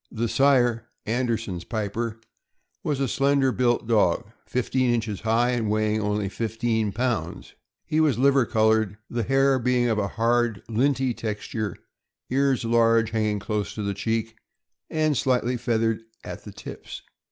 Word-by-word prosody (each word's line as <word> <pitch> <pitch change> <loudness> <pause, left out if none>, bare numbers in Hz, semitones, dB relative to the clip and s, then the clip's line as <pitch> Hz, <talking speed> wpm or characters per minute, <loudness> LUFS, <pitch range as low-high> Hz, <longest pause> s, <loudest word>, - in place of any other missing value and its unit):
The 115 +1 -1
sire, 120 -3 +3 0.2
Anderson's 115 -6 -1
Piper, 110 +2 -3 0.6
was 145 -3 -1
a 135 - +1
slender 135 +1 +2
built 120 -2 +1
dog, 105 -3 +2 0.2
fifteen 125 0 0
inches 110 -4 -2
high, 115 +3 +2
and 115 -4 -1
weighing 110 0 +1
only 105 -1 -1
fifteen 110 0 -1
pounds; 110 -6 -3 0.3
he 155 - 0
was 150 -7 +3
liver 135 -1 +4
col 110 0 +3
ored, 110 -2 0
the 120 - -1
hair 135 +3 +3
being 125 0 +2
of 110 -2 +1
a 100 - 0
hard, 115 -2 +1
linty 130 +2 +1
texture; 110 -1 -4 0.5
ears 135 -2 +2
large, 115 -1 +3
hanging 110 -2 0
close 105 0 -3
to 105 - -4
the 100 0 -1
cheek, 110 +2 -2 0.5
and 155 -2 +1
slightly 125 +2 +1
feathered 115 -2 0 0.2
at - - -8
the - - -8
tips. - - -9
115 Hz, 150 wpm, -25 LUFS, 110-125 Hz, 0.6 s, liver